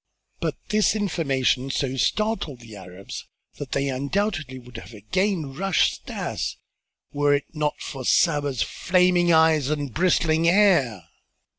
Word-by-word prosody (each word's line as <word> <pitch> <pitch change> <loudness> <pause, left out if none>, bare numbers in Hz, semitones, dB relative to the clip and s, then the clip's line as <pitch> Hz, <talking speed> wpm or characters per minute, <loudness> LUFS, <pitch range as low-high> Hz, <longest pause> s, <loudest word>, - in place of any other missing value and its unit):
But - - -2
this 215 0 +2
information 135 -10 0
so 135 -1 -1
startled 190 - -1
the 115 -2 -12
Arabs 90 0 -9 0.3
that - - -6
they 140 - 0
undoubtedly 140 +1 -2
would 125 -1 -11
have 115 - -11
again 160 - -1
rushed 195 +4 0
at - - -4
Stas - - -3 0.6
were 145 0 +3
it 140 - -2
not 150 -2 -2
for 135 -3 -7
Saba's 145 -3 +2
flaming 180 -1 +2
eyes 160 -3 +4
and 145 -5 -3
bristling 165 -2 +2
hair. 170 - +3
150 Hz, 135 wpm, -24 LUFS, 130-180 Hz, 0.6 s, eyes